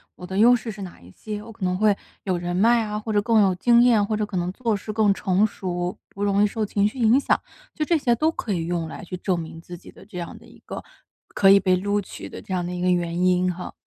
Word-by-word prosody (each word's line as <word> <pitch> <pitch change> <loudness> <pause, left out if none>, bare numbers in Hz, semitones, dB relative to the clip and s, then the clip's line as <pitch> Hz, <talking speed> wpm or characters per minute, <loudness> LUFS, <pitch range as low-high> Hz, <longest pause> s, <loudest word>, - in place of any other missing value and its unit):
我 180 - -10
的 190 +1 -5
优 235 +4 +7
势 235 -1 -4
是 205 0 -9
哪 185 -3 -9
一 90 +1 -15
些？ 210 - -7
我 225 - -11
可 220 -2 -10
能 180 0 0
会 210 0 +3 0.3
有 185 -2 -1
人 175 0 -3
脉 230 +5 +4
啊， 210 -1 -4
或 220 +1 -5
者 205 - +3
更 225 0 +3
有 195 -2 +3
经 235 +5 +4
验， 235 -4 +4
或 215 +1 -1
者 210 0 -1
可 200 -2 -5
能 175 0 -1
做 230 -1 -1
事 205 +2 -6
更 210 -2 +3
成 195 +1 +1
熟， 180 -3 -3
不 200 - -6
容 200 0 +2
易 - - +4
受 215 +1 -2
情 200 0 +1
绪 215 - -7
影 235 +2 +4
响。 - - +1 0.4
就 310 - -1
这 335 +2 +2
些 245 -5 +2
都 310 +7 +1
可 225 -9 -4
以 165 -3 -2
用 170 -1 -2
来 160 - -9
去 180 -1 -6
证 180 0 -1
明 165 0 -8
自 175 +1 -10
己 170 - -14
的 - - -16
这 195 -3 -10
样 170 - -7
的 - - -17
一 - - -17
个 - - -7 0.5
可 195 - +5
以 200 - +7
被 185 -1 +2
录 205 +3 0
取 - - -9
的 - - -9
这 190 - -7
样 180 -1 -1
的 180 - -4
一 180 - -4
个 180 - +2
原 175 -1 0
因 180 0 +2
哈。 180 +1 -8
200 Hz, 310 characters per minute, -23 LUFS, 180-215 Hz, 0.5 s, 优